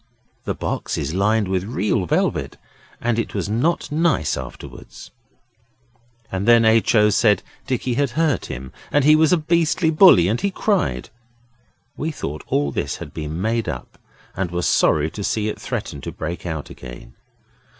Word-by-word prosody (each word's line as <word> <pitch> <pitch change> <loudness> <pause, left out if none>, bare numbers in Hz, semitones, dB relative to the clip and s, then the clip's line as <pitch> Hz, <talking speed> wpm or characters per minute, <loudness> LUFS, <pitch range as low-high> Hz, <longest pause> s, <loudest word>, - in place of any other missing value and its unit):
The - - -2
box - - -3
is 80 - -3
lined 105 +2 +2
with 95 -1 -1
red 100 -3 -1
velvet 70 0 0 0.4
and 120 -1 0
it 115 - -3
was 100 -2 -2
not 125 +13 0
nice 155 - +1
afterwards. 65 -1 -10 1.2
And 95 +3 -2
then 115 -1 +6
H. 110 +1 +3
O. 105 -1 +5
said 105 -2 +3 0.2
Dicky 130 -1 -1
had 140 +2 +1
hurt 155 - +1
him, 65 +1 -7 0.2
and 145 - +3
he 155 +1 +7
was 155 0 +4
a 180 - +5
beastly 165 +1 +1
bully, 155 - +7
and 110 +5 0
he 200 - +1
cried. 185 - -1 0.8
We 160 - -3
thought 75 - -5
all 70 0 0
this - - -2
had - - -9
been 80 +1 -5
made 115 +3 -1
up, - - -7 0.4
and 95 -2 -2
were 90 0 -3
sorry 80 -2 +2
to 105 - -6
see 105 +1 -1
it - - -6
threaten 70 - -4
to - - -6
break 85 +2 -5
out 80 -3 -5
again. - - -11
105 Hz, 170 wpm, -21 LUFS, -, 1.2 s, he